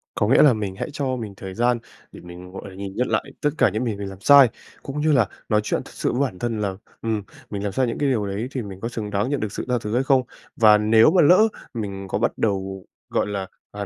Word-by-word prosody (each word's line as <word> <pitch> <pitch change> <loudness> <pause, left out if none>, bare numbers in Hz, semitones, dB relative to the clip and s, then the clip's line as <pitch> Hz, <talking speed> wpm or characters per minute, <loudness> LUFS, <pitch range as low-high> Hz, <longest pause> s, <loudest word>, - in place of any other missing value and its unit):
Có 105 - +1
nghĩa 125 - +5
là 140 - +6
mình 105 -4 -4
hãy 100 - -4
cho 135 -3 -1
mình 110 -5 -6
thời 95 -1 -7
gian 120 +3 +1 0.3
để - - -12
mình, 90 +1 -11
gọi 95 +1 -8
là, 95 - -13
nhìn 100 0 -7
nhận 125 +1 0
lại - - +1 0.2
tất 150 - +2
cả - - +4
những 110 +4 -2
gì 110 -3 -1
mình 100 -1 -5
làm 95 0 -11
sai, 140 -2 +8 0.3
cũng 145 +2 -4
như 155 0 +3
là 125 -7 +4 0.2
nói 105 0 +3
chuyện - - -1
thật - - -13
sự - - -1
với 125 - -1
bản 105 -10 -2
thân 115 -3 -2
là, 95 -2 -2 0.3
ừm, 110 -3 -1 0.3
mình 100 -1 -4
làm 100 - -2
sai 130 +4 +1
những 115 - -3
cái 145 -2 +1
điều 110 -5 0
đấy 100 +5 -3
thì 130 - -3
mình 95 -3 -8
có 115 - -2
xứng 110 -3 -5
đáng 105 +4 -1
nhận 145 -1 -1
được 105 -2 -3
sự - - -5
tha 125 - +2
thứ 105 +1 -4
hay 125 - +2
không. 135 -2 +4 0.3
Và 110 -2 +6
nếu 110 +6 +5
mà 185 - +5
lỡ 180 +8 +6 0.3
mình 100 -4 -5
có - - -1
bắt - - 0
đầu, 95 -2 -2 0.2
gọi - - 0
là, 100 -2 -3 0.2
à, 100 0 -5
110 Hz, 280 wpm, -23 LUFS, 100-125 Hz, 0.3 s, sai